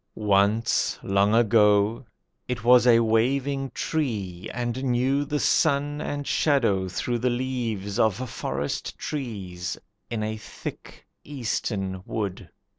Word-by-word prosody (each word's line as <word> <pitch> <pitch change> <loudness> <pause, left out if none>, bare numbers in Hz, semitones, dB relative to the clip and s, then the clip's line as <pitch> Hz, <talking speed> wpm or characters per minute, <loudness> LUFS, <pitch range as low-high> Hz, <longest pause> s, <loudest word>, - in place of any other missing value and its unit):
Once, 105 +2 +2
long 100 +2 +2
ago, 105 0 +4 0.4
it 125 -2 -3
was 125 +1 +6
a 115 -1 +6
waving 135 +5 +1
tree 105 - -3
And 120 +2 -3
knew 130 +3 +1
the 150 +1 -1
sun 145 -1 +2
and 145 0 -3
shadow 115 -14 +2
through 120 +6 -2
the 125 +2 +1
leaves 120 -6 -2
Of 110 -4 +3
forest 70 - -4
trees, 95 - -5 0.3
in 115 -2 -2
a 110 0 -3
thick 105 - -9 0.2
eastern 105 -8 -3
wood. 100 -4 -4
115 Hz, 115 wpm, -25 LUFS, 100-130 Hz, 0.4 s, was